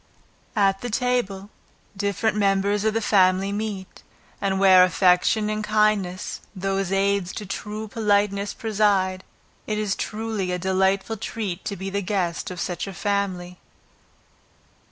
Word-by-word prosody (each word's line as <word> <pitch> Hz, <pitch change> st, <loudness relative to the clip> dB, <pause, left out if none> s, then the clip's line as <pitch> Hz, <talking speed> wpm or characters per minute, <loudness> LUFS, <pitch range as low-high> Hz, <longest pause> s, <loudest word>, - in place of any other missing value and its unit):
At 195 Hz, -2 st, +2 dB
the 245 Hz, -, -4 dB
table, 215 Hz, -5 st, -1 dB, 0.4 s
different 205 Hz, +2 st, 0 dB
members 200 Hz, 0 st, +1 dB
of 220 Hz, 0 st, +1 dB
the 225 Hz, -, 0 dB
family 190 Hz, -1 st, +3 dB
meet; 205 Hz, -3 st, -5 dB, 0.4 s
and 195 Hz, -1 st, 0 dB
where 190 Hz, -2 st, +7 dB
affection 185 Hz, +4 st, +3 dB
and 215 Hz, 0 st, -2 dB
kindness, 210 Hz, -4 st, 0 dB
those 195 Hz, 0 st, -1 dB
aids 195 Hz, -1 st, +1 dB
to 210 Hz, -, -6 dB
true 210 Hz, +2 st, -5 dB
politeness, 205 Hz, -2 st, 0 dB
preside, 200 Hz, -4 st, +1 dB, 0.4 s
it 215 Hz, -, -1 dB
is 210 Hz, -2 st, 0 dB
truly 215 Hz, -4 st, -3 dB
a 180 Hz, -, -1 dB
delightful 190 Hz, +4 st, +1 dB
treat 200 Hz, -4 st, -4 dB
to 200 Hz, -, -3 dB
be 195 Hz, +1 st, -5 dB
the 200 Hz, +1 st, -1 dB
guest 180 Hz, -3 st, -2 dB
of 180 Hz, -1 st, -7 dB
such 175 Hz, +1 st, -3 dB
a 195 Hz, -, -6 dB
family. 185 Hz, -2 st, -2 dB
200 Hz, 135 wpm, -24 LUFS, 190-210 Hz, 0.4 s, where